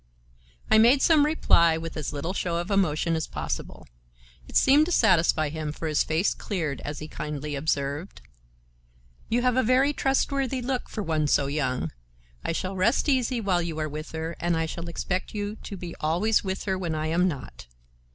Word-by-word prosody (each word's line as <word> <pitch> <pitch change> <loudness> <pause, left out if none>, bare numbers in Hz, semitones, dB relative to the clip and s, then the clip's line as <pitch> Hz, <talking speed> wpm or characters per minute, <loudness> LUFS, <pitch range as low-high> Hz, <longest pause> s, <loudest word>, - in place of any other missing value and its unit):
I 220 - +7
made 245 +5 +5
some 305 -3 +5
reply 170 - +4
with 165 0 -6
as 155 -2 -3
little 150 +5 -3
show 175 -3 -1
of 175 +4 -3
emotion 170 -4 +1
as 160 - -2
possible. - - -5 0.6
It - - -12
seemed 290 +4 +5
to - - -3
satisfy 160 - +3
him, 155 0 -4
for 160 +1 -5
his 150 -1 +2
face 165 +5 +1
cleared 160 -9 -3
as 145 0 -5
he 155 - -6
kindly 150 -1 -5
observed: 145 +3 -2 1.1
"You 240 +2 +1
have 250 -1 +2
a - - +5
very 260 +4 +3
trustworthy 270 -2 0
look 255 0 -2
for 215 - -4
one 155 -4 0
so 145 -1 +3
young. 130 - -1 0.5
I - - -1
shall 185 +3 -3
rest 210 +11 +2
easy 255 -3 +1
while 190 -5 +1
you 170 -2 -4
are 155 -1 -1
with 155 +1 -7
her, 160 +1 -4
and 175 -1 0
I 165 - 0
shall 170 +1 -6
expect 185 +4 -3
you 205 +1 -3
to 200 - -8
be 175 -1 -7
always 180 +8 +1
with 190 -1 -3
her 190 -2 -1
when 170 -4 -2
I 155 0 -2
am 170 +3 +2
not. 130 - -6
170 Hz, 190 wpm, -26 LUFS, 155-220 Hz, 1.1 s, I